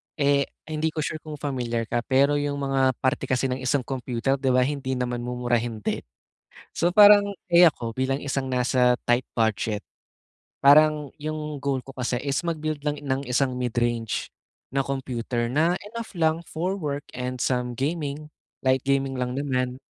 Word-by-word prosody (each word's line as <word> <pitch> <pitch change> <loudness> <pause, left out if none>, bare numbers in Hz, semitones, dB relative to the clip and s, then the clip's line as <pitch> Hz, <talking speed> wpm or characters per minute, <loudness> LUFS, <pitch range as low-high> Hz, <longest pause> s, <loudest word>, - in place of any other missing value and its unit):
Eh, 140 -2 +2 0.2
hindi 155 0 -1
ko 155 -1 -2
sure 155 - -3
kung 155 -1 -8
familiar 120 -5 -2
ka, 120 - 0
pero 140 +2 +3
'yong 145 0 -1
mga 135 -2 +1
parte 130 - +1
kasi 130 +1 +1
ng 130 - -2
isang 130 +1 0
computer 130 +1 -2
di 135 - -2
ba 125 0 +4
hindi 135 -1 -2
naman 125 -1 -2
mumurahin 120 -2 -1
din. - - -1 0.8
So, 175 +1 +2
parang 205 +1 +8 0.2
eh, 175 0 +6
ako 115 -6 -3
bilang 135 +1 0
isang 135 -1 -2
nasa 125 0 +2
tight 120 +1 +3
budget, 110 -2 0 0.8
parang 150 0 +5
'yong 150 -2 -4
goal 135 -2 -1
ko 135 - -10
kasi 125 -1 -1
is 140 +3 -1
mag-build 155 -3 -3
lang 150 0 -1
ng 135 -1 -2
isang 130 +1 +1
mid-range 120 -2 -1 0.5
na 135 - +2
computer 125 -3 -2
na 165 +7 +2 0.2
enough 230 -2 -6
lang 160 0 +2
for 180 +4 -2
work 145 -6 -4
and 125 0 -4
some 125 -1 0
gaming, 150 0 -2 0.4
light 130 0 +3
gaming 135 -1 0
lang 125 -1 -2
naman. 130 -3 -1
135 Hz, 165 wpm, -25 LUFS, 125-150 Hz, 0.8 s, parang